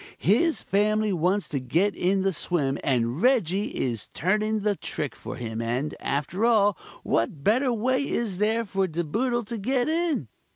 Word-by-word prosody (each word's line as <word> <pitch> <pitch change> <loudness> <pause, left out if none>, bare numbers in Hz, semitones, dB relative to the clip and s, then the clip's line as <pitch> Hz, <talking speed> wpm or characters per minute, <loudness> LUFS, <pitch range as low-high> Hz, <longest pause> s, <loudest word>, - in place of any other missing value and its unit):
His 280 - +2
family 210 +1 +1
wants 180 +4 +1
to 140 - -2
get 170 +11 +1
in 190 +2 +1
the 195 0 +1
swim, 145 -4 -1
and 125 +1 0
Reggie 210 -6 +2
is 115 -5 -3
turning 215 +5 +1
the 205 0 +1
trick 145 -6 -4
for - - -7
them 115 -2 -4
and 125 +6 -2
after 150 +9 -2
all, 210 -4 +4 0.3
what 130 +6 -1
better 250 - +3
way 260 +4 0
is 210 -6 -2
there 220 +2 +1
for 195 -1 0
De 170 0 -2
Boodle 240 - -1
to 230 +2 -5
get 250 +4 0
in? 320 - 0
200 Hz, 170 wpm, -26 LUFS, 150-230 Hz, 0.3 s, all